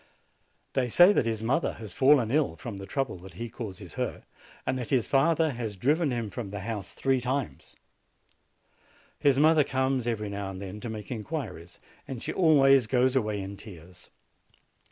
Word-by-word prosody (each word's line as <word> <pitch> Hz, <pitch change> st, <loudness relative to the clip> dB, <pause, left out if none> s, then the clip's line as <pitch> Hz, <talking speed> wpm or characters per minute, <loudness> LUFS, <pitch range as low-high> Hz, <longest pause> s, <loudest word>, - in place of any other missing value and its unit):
They 125 Hz, -2 st, 0 dB
say 175 Hz, -, +7 dB
that 115 Hz, -, +1 dB
his 110 Hz, -1 st, -2 dB
mother 135 Hz, +8 st, +1 dB
has 110 Hz, -5 st, -9 dB
fallen 130 Hz, -4 st, +4 dB
ill 145 Hz, -, +1 dB
from 100 Hz, +5 st, -7 dB
the 95 Hz, 0 st, -8 dB
trouble 135 Hz, -9 st, -2 dB
that 90 Hz, -1 st, -13 dB
he 115 Hz, +5 st, -5 dB
causes 110 Hz, -5 st, -8 dB
her, -, -, -3 dB, 0.4 s
and 130 Hz, 0 st, -1 dB
that 120 Hz, -, -5 dB
his 125 Hz, -5 st, +2 dB
father 160 Hz, +3 st, +3 dB
has 115 Hz, -5 st, -5 dB
driven 150 Hz, -, +2 dB
him 115 Hz, -5 st, -3 dB
from 115 Hz, -5 st, -5 dB
the 100 Hz, 0 st, -6 dB
house 105 Hz, -2 st, -5 dB
three 135 Hz, -1 st, +1 dB
times. 125 Hz, -, -3 dB, 1.4 s
His 140 Hz, -2 st, +3 dB
mother 155 Hz, +1 st, +5 dB
comes 130 Hz, -2 st, 0 dB
every 105 Hz, -3 st, -2 dB
now 100 Hz, -1 st, -4 dB
and 95 Hz, -1 st, -7 dB
then 100 Hz, +1 st, -7 dB
to 120 Hz, -, -6 dB
make 110 Hz, 0 st, -7 dB
inquiries, 105 Hz, -, -5 dB, 0.3 s
and 130 Hz, -4 st, -6 dB
she -, -, -3 dB
always 135 Hz, -7 st, +5 dB
goes 125 Hz, +3 st, +2 dB
away 105 Hz, -5 st, 0 dB
in 100 Hz, +1 st, -7 dB
tears. 90 Hz, -4 st, -13 dB
120 Hz, 175 wpm, -28 LUFS, 105-135 Hz, 1.4 s, say